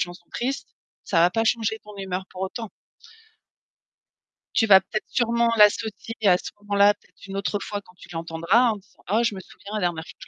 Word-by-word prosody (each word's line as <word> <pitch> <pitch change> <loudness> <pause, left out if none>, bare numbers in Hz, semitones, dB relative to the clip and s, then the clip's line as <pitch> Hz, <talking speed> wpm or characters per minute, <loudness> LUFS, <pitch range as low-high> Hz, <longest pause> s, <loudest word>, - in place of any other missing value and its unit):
chanson 175 0 -4
triste, 265 +3 -3 0.4
ça 175 - +1
va 175 - +5
pas 225 +4 0
changer 220 -1 +1
ton 210 -1 -12
humeur 190 -1 -4
pour 185 - -7
autant. 220 +3 -4 1.9
Tu 225 - +4
vas 195 -2 +9
peut-être 215 +3 -4
sûrement 235 -1 +2
l'associer 215 +1 +3
à 180 -2 +6
ce - - -7
moment-là, 205 0 +4
peut-être 200 -1 -19
une 195 - -7
autre 200 +1 -1
fois 205 -1 -4
quand 180 - -19
tu - - -13
l'entendras, 165 +8 +2
en 215 - -4
disant: 200 0 -22
«Oh, 220 +3 +4
je 215 -3 0
me 190 - -7
souviens, 200 +3 -12
la 215 - -1
dernière 170 -2 -1
fois - - -12
que - - -13
205 Hz, 205 wpm, -24 LUFS, 185-220 Hz, 1.9 s, vas